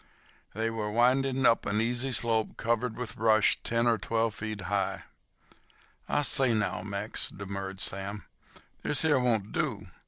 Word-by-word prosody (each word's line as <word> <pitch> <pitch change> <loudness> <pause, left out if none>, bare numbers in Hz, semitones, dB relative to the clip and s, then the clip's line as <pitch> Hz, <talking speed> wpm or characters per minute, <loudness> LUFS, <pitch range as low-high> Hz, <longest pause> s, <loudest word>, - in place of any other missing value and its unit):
They 110 +1 -1
were 110 -2 -3
winding 130 +3 +2
up 115 - +3
an 105 - 0
easy 120 +3 0
slope 115 -3 +1
covered 115 0 -1
with 120 -5 -5
brush 110 -1 +3
ten 115 0 +1
or 115 -2 +2
twelve 115 +2 0
feet 110 -1 -5
high. 95 0 -2 1.1
"I 145 - +2
say 135 -5 +4
now, 105 -1 -1
Mex," 105 +1 -2
demurred 95 -1 -6
Sam, 100 +2 -3 0.6
"this 145 - +1
here 150 -4 +3
won't 110 -5 0
do. - - -2
115 Hz, 150 wpm, -29 LUFS, 105-120 Hz, 1.1 s, say